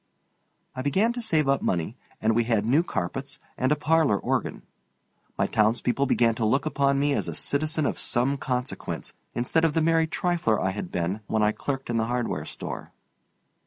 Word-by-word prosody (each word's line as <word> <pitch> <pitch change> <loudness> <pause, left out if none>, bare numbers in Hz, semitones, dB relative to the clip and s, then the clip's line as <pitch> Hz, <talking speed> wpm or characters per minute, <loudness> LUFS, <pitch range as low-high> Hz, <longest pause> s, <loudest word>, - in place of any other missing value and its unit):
I 130 - -3
began 190 - +2
to 240 - -4
save 160 -11 +1
up 135 0 +2
money, 85 +5 -1 0.2
and 110 0 +2
we 120 0 +2
had 110 -3 +1
new 135 +8 +4
carpets, 135 - -4 0.2
and 130 +2 0
a - - +5
parlor 155 -8 +3
organ. - - -2 0.7
My - - +2
townspeople 115 +5 +1
began 115 -3 +3
to - - +2
look 135 +7 +2
upon 140 -2 +2
me 145 +1 +2
as - - 0
a - - -4
citizen 155 +1 0
of - - -1
some 125 +4 +1
consequence 125 -1 -3 0.2
instead 125 +7 +1
of 160 -2 +3
the 160 - +2
merry 165 0 +3
trifler 165 -10 0
I 95 - 0
had 95 -2 -5
been 90 +3 -1
when 110 -1 +1
I 105 - +4
clerked 135 +2 -4
in 115 - 0
the 115 0 +1
hardware 120 0 -2
store. - - -7
135 Hz, 190 wpm, -26 LUFS, 115-155 Hz, 0.7 s, a